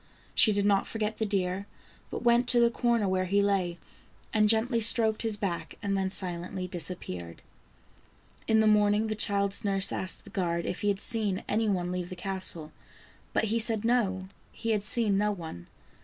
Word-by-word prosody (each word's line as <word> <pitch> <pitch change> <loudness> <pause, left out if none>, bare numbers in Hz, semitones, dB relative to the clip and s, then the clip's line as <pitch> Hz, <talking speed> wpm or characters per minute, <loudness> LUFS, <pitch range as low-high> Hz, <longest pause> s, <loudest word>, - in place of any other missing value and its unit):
She 220 - +4
did 200 -1 0
not 200 -1 +2
forget 215 -1 -3
the 220 - 0
deer, 195 0 -2 0.4
but - - -6
went 240 +1 +3
to 245 -1 +2
the 235 0 +4
corner 235 -4 +1
where 185 0 0
he 200 +2 +1
lay 195 -4 0 0.6
and 215 -1 +3
gently 230 +2 +1
stroked 220 -1 +5
his 220 -2 +1
back 195 -4 -4
and 200 -1 -1
then 190 -1 -1
silently 185 0 -2
disappeared. 90 - -5 1.0
In 220 0 +4
the - - +2
morning 210 0 +3
the - - 0
child's 200 -1 +3
nurse 195 -1 +2
asked 185 - -3
the - - -14
guard 170 -4 -2
if - - -4
he 205 - -1
had 200 -1 +1
seen 215 -5 -1
any 220 +1 0
one 180 -2 -1
leave 180 -1 -4
the 185 - -6
castle, 180 -4 -1 0.6
but - - 0
he 230 - +1
said 225 -1 +1
no, 195 -6 0 0.2
he 230 - -4
had 210 -2 0
seen 210 -2 +2
no 210 0 +1
one. 160 - -8
200 Hz, 185 wpm, -28 LUFS, 185-220 Hz, 1.0 s, stroked